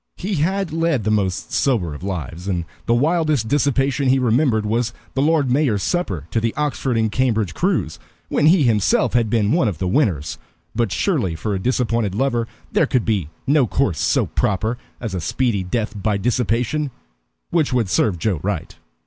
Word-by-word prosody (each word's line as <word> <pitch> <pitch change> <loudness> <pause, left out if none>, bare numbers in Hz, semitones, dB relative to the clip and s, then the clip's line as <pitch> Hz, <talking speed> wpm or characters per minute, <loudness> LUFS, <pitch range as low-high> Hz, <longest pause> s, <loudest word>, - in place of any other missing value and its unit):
He 195 0 -2
had 185 +2 0
led 165 -7 +1
the 110 - 0
most 95 -4 -1
sober 105 - +1
of 75 - -9
lives, 90 -2 -5
and 90 -4 -1 0.2
the 115 - +3
wildest 155 -3 +1
dissipation 140 0 +1
he 135 - +4
remembered 120 -2 +2
was 115 +2 0 0.2
the 135 - 0
Lord 150 -3 +2
Mayor's 125 -8 +2
supper 100 - -1
to 115 - 0
the 115 0 -1
Oxford 140 -4 -1
and 110 -1 +1
Cambridge 110 -7 0
crews, - - -1 0.3
when 150 - +2
he 165 -1 +5
himself 115 +1 +2
had 115 -3 +2
been 105 -2 +2
one 160 -8 +3
of 100 -6 -2
the 90 - -2
winners. 85 - 0 0.3
But 115 -3 0
surely, 110 - 0
for 105 +6 -3
a 95 - -1
disappointed 115 -3 0
lover 120 -1 0 0.2
there - - +2
could 125 - +1
be 100 -9 0 0.2
no 140 -2 +3
course 105 - 0
so - - +2
proper 110 +5 -1 0.2
as 115 -5 -5
a 90 - -2
speedy 105 - 0
death 110 +4 -2
by 105 0 +1
dissipation 125 +6 0 0.6
which 160 -5 +2
would 120 -4 +1
serve 90 +1 +1
Joe 95 -1 -1
right. 95 -3 -3
115 Hz, 185 wpm, -21 LUFS, 100-135 Hz, 0.6 s, he